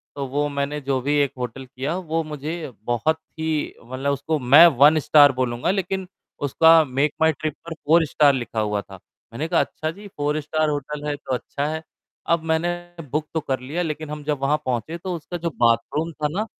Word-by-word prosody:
तो 140 Hz, -, -3 dB
वो 145 Hz, +3 st, 0 dB
मैंने 140 Hz, +1 st, -2 dB
जो 135 Hz, -1 st, 0 dB
भी 145 Hz, +3 st, 0 dB
एक 140 Hz, -, +1 dB
होटल 125 Hz, +1 st, -5 dB
किया, 135 Hz, +6 st, -4 dB
वो 165 Hz, -3 st, -2 dB
मुझे 155 Hz, +1 st, -5 dB
बहुत 120 Hz, +7 st, +1 dB, 0.2 s
ही 160 Hz, -1 st, -1 dB
मतलब 130 Hz, +3 st, -2 dB
उसको 140 Hz, +3 st, -1 dB
मैं 140 Hz, +6 st, +8 dB
1 150 Hz, +3 st, +7 dB
स्टार 145 Hz, -1 st, +6 dB
बोलूँगा 125 Hz, +6 st, 0 dB
लेकिन 190 Hz, -1 st, -2 dB, 0.4 s
उसका 160 Hz, +3 st, +6 dB
मेक 140 Hz, +2 st, 0 dB
माय 160 Hz, 0 st, +5 dB
ट्रिप 155 Hz, +1 st, -3 dB
पर 170 Hz, -, -5 dB
4 160 Hz, +1 st, +3 dB
स्टार 145 Hz, -1 st, +4 dB
लिखा 120 Hz, -3 st, -3 dB
हुआ 105 Hz, -1 st, 0 dB
था, 95 Hz, -2 st, -13 dB, 0.3 s
मैंने 150 Hz, +7 st, -3 dB
कहा, -, -, +2 dB
"अच्छा 155 Hz, 0 st, -3 dB
जी, 205 Hz, +5 st, -12 dB
4 150 Hz, +1 st, 0 dB
स्टार 155 Hz, +1 st, 0 dB
होटल 145 Hz, 0 st, -4 dB
है, 145 Hz, -, -1 dB
तो 135 Hz, -2 st, -5 dB
अच्छा 140 Hz, +3 st, -4 dB
है।" 160 Hz, +1 st, -4 dB, 0.4 s
अब 170 Hz, -1 st, +2 dB
मैंने 165 Hz, +2 st, +1 dB, 0.4 s
बुक 150 Hz, +1 st, -1 dB
तो 160 Hz, -, +1 dB
कर 135 Hz, -3 st, -2 dB
लिया, 145 Hz, +8 st, -3 dB
लेकिन 155 Hz, -2 st, -4 dB
हम 150 Hz, 0 st, -6 dB
जब 145 Hz, -1 st, -1 dB
वहाँ 140 Hz, +2 st, +2 dB
पहुँचे 130 Hz, +7 st, -2 dB
तो 180 Hz, +1 st, -5 dB
उसका 170 Hz, +2 st, -6 dB
जो 170 Hz, 0 st, -2 dB
बाथरूम 120 Hz, +7 st, +2 dB
था 155 Hz, -1 st, -2 dB
ना, 210 Hz, +5 st, -1 dB
150 Hz, 205 wpm, -23 LUFS, 135-160 Hz, 0.4 s, मैं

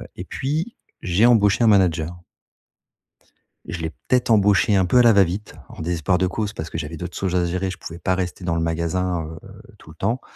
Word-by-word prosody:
et -, -, -6 dB
puis, 155 Hz, -, -3 dB, 0.3 s
j'ai 90 Hz, +5 st, +2 dB
embauché 110 Hz, -2 st, +4 dB
un -, -, +4 dB
manager. 90 Hz, -4 st, +2 dB, 1.5 s
Je 85 Hz, -, -5 dB
l'ai 80 Hz, -, -2 dB
peut-être 125 Hz, +7 st, -1 dB
embauché 105 Hz, -1 st, +4 dB
un 95 Hz, -, +3 dB
peu 125 Hz, +8 st, +4 dB
à -, -, +8 dB
la 115 Hz, -, +7 dB
va-vite, 100 Hz, -1 st, +1 dB
en -, -, -10 dB
désespoir 85 Hz, +1 st, 0 dB
de 95 Hz, 0 st, +1 dB
cause 105 Hz, +3 st, -3 dB
parce 80 Hz, -5 st, -6 dB
que -, -, -5 dB
j'avais 80 Hz, 0 st, -5 dB
d'autres 90 Hz, +3 st, -7 dB
choses 95 Hz, -2 st, -1 dB
à 90 Hz, -1 st, +2 dB
gérer, 90 Hz, +2 st, -2 dB
je 90 Hz, -, -6 dB
pouvais 85 Hz, +1 st, -9 dB
pas 90 Hz, +3 st, 0 dB
rester 90 Hz, 0 st, -4 dB
dans 85 Hz, -2 st, 0 dB
le 85 Hz, -, -1 dB
magasin, 85 Hz, +2 st, -1 dB
heu 80 Hz, 0 st, -9 dB
heu, -, -, -14 dB, 0.2 s
tout -, -, -17 dB
le 80 Hz, -, -13 dB
temps. 115 Hz, +9 st, -1 dB
90 Hz, 220 wpm, -22 LUFS, 85-105 Hz, 1.5 s, à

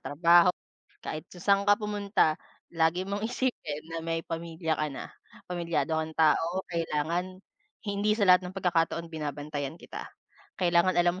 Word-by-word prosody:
trabaho, 170 Hz, +4 st, +5 dB, 0.5 s
kahit 155 Hz, -, -4 dB
saan 195 Hz, +2 st, +2 dB
ka 205 Hz, -, +7 dB
pumunta, 205 Hz, -6 st, +1 dB, 0.4 s
lagi 165 Hz, +2 st, +2 dB
mong 200 Hz, +1 st, -3 dB
isipin 235 Hz, -, -2 dB
na 165 Hz, -, -2 dB
may 165 Hz, 0 st, -2 dB
pamilya 165 Hz, -1 st, -2 dB
ka 155 Hz, -, -1 dB
na. 135 Hz, -, -6 dB, 0.4 s
Pamilyado 170 Hz, -2 st, -1 dB
kang 160 Hz, 0 st, -8 dB
tao, 165 Hz, +4 st, +3 dB
kailangan 170 Hz, +3 st, -1 dB, 0.5 s
hindi 205 Hz, +1 st, 0 dB
sa 205 Hz, -, +4 dB
lahat 180 Hz, 0 st, +7 dB
ng 180 Hz, +1 st, -7 dB
pagkakataon 170 Hz, -2 st, +1 dB
binabantayan 145 Hz, -1 st, -4 dB
kita. -, -, -8 dB, 0.5 s
Kailangan 175 Hz, 0 st, +3 dB
alam 175 Hz, 0 st, +4 dB
170 Hz, 140 wpm, -28 LUFS, 160-185 Hz, 0.5 s, ka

